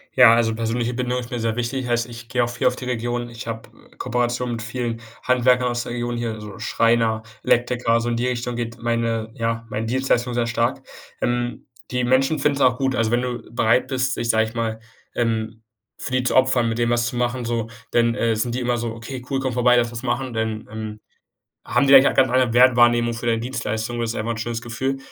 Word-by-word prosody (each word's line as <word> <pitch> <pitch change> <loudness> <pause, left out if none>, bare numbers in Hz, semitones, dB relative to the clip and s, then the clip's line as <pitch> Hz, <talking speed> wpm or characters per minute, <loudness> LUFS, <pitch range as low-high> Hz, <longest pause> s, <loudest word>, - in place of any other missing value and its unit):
Ja, 115 - +8
also, 115 -1 +2
persönliche 115 +1 -1
Bindung 125 0 -1
ist 120 - -7
mir 120 -2 -3
sehr 115 0 -1
wichtig, 125 +1 -2
heißt, 120 0 0
ich 115 0 -10
gehe 125 -1 +1
auch 120 - -1
viel 120 - -3
auf - - +3
die 125 - -7
Region. 120 0 -2
Ich 115 -1 -9
habe 115 -1 -6 0.3
Kooperationen 120 0 -1
mit 115 - -6
vielen 115 0 -4 0.2
Handwerkern 125 0 +3
aus 120 0 -1
der - - -7
Region 120 0 -2
hier, 115 -2 -3
so 105 0 -9
Schreiner, 115 0 +1 0.2
Elektriker, 120 -1 +2
so 120 - -2
in 120 - 0
die 120 +2 0
Richtung 125 -1 -2
geht 115 0 -5
meine 115 -1 -1
ja, 115 0 -2
meine 110 +1 -3
Dienstleistung 125 0 0
sehr 120 -1 0
stark. 115 0 0 0.4
Ähm, 120 0 -2 0.2
die 125 0 0
Menschen 135 +5 +2
finden 145 0 +2
es - - -3
auch 125 -1 +4
gut. 135 -1 0
Also, 115 -1 +1
wenn 120 +1 +2
du 120 -2 -5
bereit 120 +2 +2
bist, 130 -1 -1
dich, 115 - -2
sage 110 0 +3
ich 110 +2 -9
mal, 110 -1 -2 0.4
ähm, 110 -1 -1 0.4
für - - -5
die 130 0 +2
zu 125 - 0
opfern, 130 -3 +3
mit 115 - -2
denen 120 0 +1
was 120 0 +2
zu 120 - -4
machen, 120 0 -1
so 115 -1 -1 0.2
dann, 115 0 +2
äh, 115 -2 +1
sind 120 +2 -1
die 125 - -2
immer 120 0 0
so: 115 -1 -3
„Okay, 125 +3 -7
cool. 135 -1 0
Komme 130 -2 -2
vorbei. 125 0 +4
Lass 120 -1 +1
was 120 -1 -6
machen.” 125 0 -2
Denn, 110 -1 -3
ähm, 110 -1 -6 0.7
haben 140 - +2
die 135 - +3
da 135 - +12
eigentlich 135 - +5
auch - - -8
ganz 130 -1 +4
andere 125 -2 +2
Wertwahrnehmung 120 -1 +5
für 115 +1 -5
deine 115 -1 +2
Dienstleistung. 120 -1 -3
Das 115 -1 -1
ist - - -6
einfach 115 +2 -2
'n - - -7
schönes 115 +1 -3
Gefühl, 130 +3 -2
120 Hz, 235 wpm, -22 LUFS, 115-125 Hz, 0.7 s, da